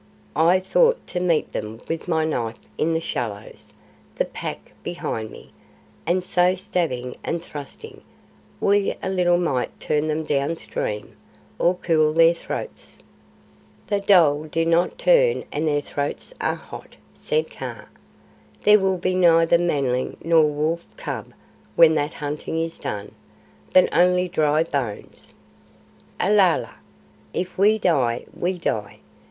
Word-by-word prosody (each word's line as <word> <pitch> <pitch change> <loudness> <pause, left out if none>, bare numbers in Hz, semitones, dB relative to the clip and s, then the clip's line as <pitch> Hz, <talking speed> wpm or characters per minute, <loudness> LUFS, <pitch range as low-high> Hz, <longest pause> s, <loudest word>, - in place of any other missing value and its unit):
I 170 +4 +4
thought 485 - +2
to 180 - -2
meet 170 -3 +1
them 110 +1 -5
with 165 +2 -4
my 160 -2 +1
knife 115 -7 -2 0.2
in 165 +1 0
the - - +1
shallows, 110 -9 -6 0.4
the - - 0
Pack - - -7
behind 110 -1 -4
me; - - -14 0.6
and 180 +2 +1
so 180 0 +2
stabbing 170 -10 -3
and 170 0 -3
thrusting, 150 - -10 0.6
we 200 0 +2
a - - -1
little 175 -2 +3
might 140 -8 -2
turn 150 0 0
them 155 +1 -1
down 145 +2 -1
stream, 105 -8 -4 0.4
or 175 +2 +3
cool 155 -3 +2
their 165 +1 +6
throats." 315 - -7 0.9
"The 205 - 0
dhole 165 -7 +4
do 165 +1 -1
not 170 +2 +2
turn - - +3
and 155 +2 -1
their 145 -1 +1
throats 145 - -4
are - - 0
hot," - - -11 0.2
said 470 -1 -2
Kaa. - - -7 0.8
"There 210 0 +7
will 190 -1 +1
be 185 +1 -1
neither 170 -2 +4
Manling 140 -7 0
nor 165 -1 +5
Wolf 155 +3 -1
cub - - -6 0.4
when 165 -1 +7
that 150 -1 -1
hunting 150 +2 -4
is 165 0 -4
done, 100 0 -5 0.6
but 185 - +6
only 180 +1 +4
dry 155 -2 +2
bones." 135 -10 -5 0.8
"Alala! 195 -2 +2 0.6
If 185 0 -3
we 210 +3 +4
die, 130 - +1
we 180 +1 -2
die. 105 - -3
165 Hz, 135 wpm, -23 LUFS, 145-185 Hz, 0.9 s, There